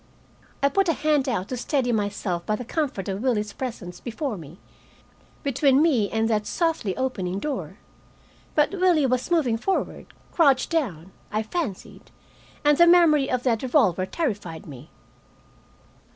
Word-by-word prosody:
I 280 - +5
put 390 +3 +1
a - - +4
hand 295 -2 +1
out 205 -5 -2
to 255 - -3
steady 245 0 0
myself 205 -5 -2
by 215 - +1
the 245 - -6
comfort 260 - -2
of 195 +1 -3
Willie's 215 -5 0
presence 205 -9 -6
before 250 +1 -4
me, 165 -1 -11 0.9
between 275 -1 +3
me 265 -11 +3
and 225 0 0
that 215 -2 0
softly 220 - -1
opening 195 -9 -2
door. 285 +7 -4 0.8
But 300 -1 +3
Willie 360 -6 +3
was 255 +2 0
moving 290 -10 +2
forward, 385 +10 -2 0.2
crouched 280 -5 +3
down, 195 - -2 0.2
I 215 +1 0
fancied, 230 - -5 0.6
and 295 +1 +4
the 345 - +7
memory 325 -5 +5
of 250 -1 -1
that 230 -4 +1
revolver 225 - +2
terrified 205 - -3
me. 140 -1 -11
250 Hz, 150 wpm, -24 LUFS, 205-300 Hz, 0.9 s, the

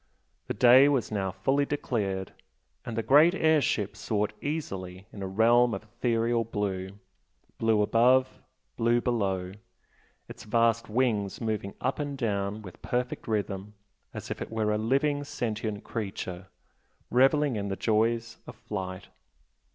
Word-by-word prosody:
The - - -3
day 125 +5 +7
was 130 -7 0
now 100 -3 -1
fully 135 +10 +1
declared, 105 -10 -2 0.5
and 115 -2 -6
the 115 - 0
great 155 +8 +6
air 160 -4 +3
ship 105 -6 -1
soared 105 -1 -1
easily 95 - -4
in 100 - -8
a 95 - -3
realm 115 +4 +4
of - - -7
ethereal 115 +1 0
blue 100 -3 -3 0.6
blue 110 -2 +3
above, 125 +4 +3 0.4
blue 120 +1 +3
below 95 -7 -1 0.8
its 120 - -10
vast 115 0 +1
wings 110 -4 0
moving 105 -3 -3
up 130 - -1
and 145 -1 -3
down 105 -3 -2
with 90 -3 -12
perfect 125 0 -3
rhythm 105 -1 -3 0.4
as - - -7
if - - -5
it - - -4
were 110 -1 0
a 105 - +1
living, 140 +5 +1
sentient 110 -6 -4
creature, 95 -4 -5 0.6
revelling 135 +1 +3
in 100 -1 -3
the 95 - -2
joys 115 +2 0
of 125 - -9
flight. 95 -3 -6
115 Hz, 145 wpm, -28 LUFS, 100-125 Hz, 0.8 s, day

